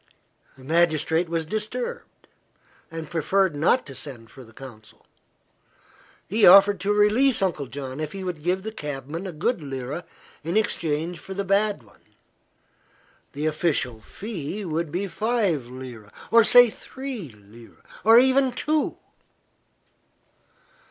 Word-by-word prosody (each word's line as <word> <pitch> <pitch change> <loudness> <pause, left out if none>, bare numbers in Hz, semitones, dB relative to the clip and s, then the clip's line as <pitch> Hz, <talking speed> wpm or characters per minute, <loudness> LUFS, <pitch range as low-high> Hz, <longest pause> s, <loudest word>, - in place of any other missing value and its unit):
The 130 - -15
magistrate 160 +2 +1
was 165 -1 -1
disturbed, 240 - -5 0.6
and 165 -2 -7
preferred 175 +2 +1
not 165 - +2
to 140 - -10
send 120 -5 -8
for 130 - -12
the 115 - -17
consul. 115 -3 -13 1.2
He 215 +3 0
offered 200 +1 +8
to 195 +2 -1
release 215 +5 +3
Uncle 155 -7 -1
John 135 +1 -7
if 155 -1 -4
he 195 -1 -7
would 180 -4 -5
give 180 +4 -1
the 220 - -5
cabman 150 - -6
a - - -5
good 170 +6 -1
lira 135 +3 -5 0.4
in 170 +6 -1
exchange 165 -5 -1
for 190 - -8
the 200 - -2
bad 200 - +1
one. 105 - -23 1.3
The 145 +2 -3
official 150 -7 -1
fee 200 - -6
would 165 -1 -2
be 185 +5 -2
five 200 - -1
lira 125 -4 -10 0.2
or 230 0 +7
say 245 +1 +7
three 260 - -7
lira 110 +2 -17 0.2
or 225 +1 +7
even 260 +1 +4
two. 300 +4 -1
170 Hz, 135 wpm, -24 LUFS, 140-210 Hz, 1.3 s, offered